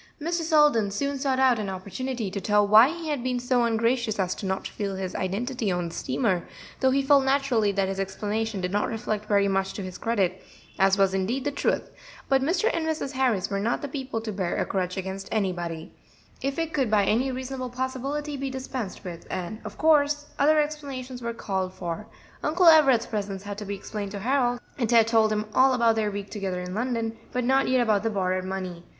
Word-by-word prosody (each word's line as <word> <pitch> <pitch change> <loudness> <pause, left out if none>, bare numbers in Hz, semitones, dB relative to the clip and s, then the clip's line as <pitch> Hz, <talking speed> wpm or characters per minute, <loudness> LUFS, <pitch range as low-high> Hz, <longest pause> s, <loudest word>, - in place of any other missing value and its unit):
Mr. 335 +3 -1
Selden 295 -10 +4
soon 280 +7 -2
sought 265 -1 0
out 260 -3 +4
an 205 -2 -3
opportunity 205 +4 -4
to 200 0 -4
tell 210 +1 +3
why 220 +5 +8
he 335 -1 -5
had 285 -5 -2
been 250 -1 0
so 245 -1 +2
ungracious 230 0 +1
as 185 -2 -1
not 190 -1 -2
to - - -5
reveal 200 -2 -3
his 190 -1 -4
identity 225 +4 -2
on 175 -2 -1
the - - -11
steamer, 190 -9 -1 0.3
though 265 - +4
he 275 +1 +2
felt 275 0 +5
naturally 265 -6 +2
that 195 -1 0
his 195 0 -3
explanation 210 +2 -2
did 180 0 -2
not 205 +1 +1
reflect 215 -2 -3
very 200 -1 +3
much 195 0 0
to 200 - -5
his 185 -1 -7
credit, 195 -5 0 0.4
as 195 +1 +4
was 195 -1 +3
indeed 210 +8 -1
the 290 - -1
truth; 280 - -1 0.4
but 270 -1 +3
Mr. 345 +9 +1
and 335 - -1
Mrs. 315 -4 -2
Harris 245 -8 0
were 200 - 0
not 230 +7 -1
the - - -2
people 265 -4 -4
to 220 -1 -4
bear 185 -3 -2
a - - 0
grudge 185 -1 -2
against 190 +1 -5
anybody 175 -5 -2 0.5
if 275 0 -2
it 330 -1 -2
could 265 -6 +1
by 210 -2 +3
any 250 +6 +1
reasonable 255 0 -4
possibility 265 +4 -3
be 275 0 -3
dispensed 260 -7 -5
with, 175 -3 -8
and 185 +4 -4
of - - -8
course 295 -2 +3
other 305 +2 +5
explanations 275 -4 -4
were 235 0 -2
called 190 -5 -3
for. 175 +4 -5 0.3
Uncle 350 +4 +2
Everett's 280 -8 +7
presence 200 -3 -4
had 205 0 -6
to 210 - -6
be 200 0 -3
explained 200 +1 -5
to 200 - -4
Harold, 245 0 +1 0.2
and 235 -4 0
Ted 230 -2 +6
told 225 -1 +3
him 215 0 0
all 260 0 +5
about 230 -2 +3
their 215 -1 +1
week 200 0 -6
together 195 -4 -3
in 180 0 -6
London, 230 0 -1 0.2
but 250 - -1
not 265 +2 +3
yet 255 -1 +3
about 215 -4 +2
the 225 - 0
borrowed 185 -3 -1
money. 185 -2 -5
225 Hz, 215 wpm, -26 LUFS, 195-265 Hz, 0.5 s, why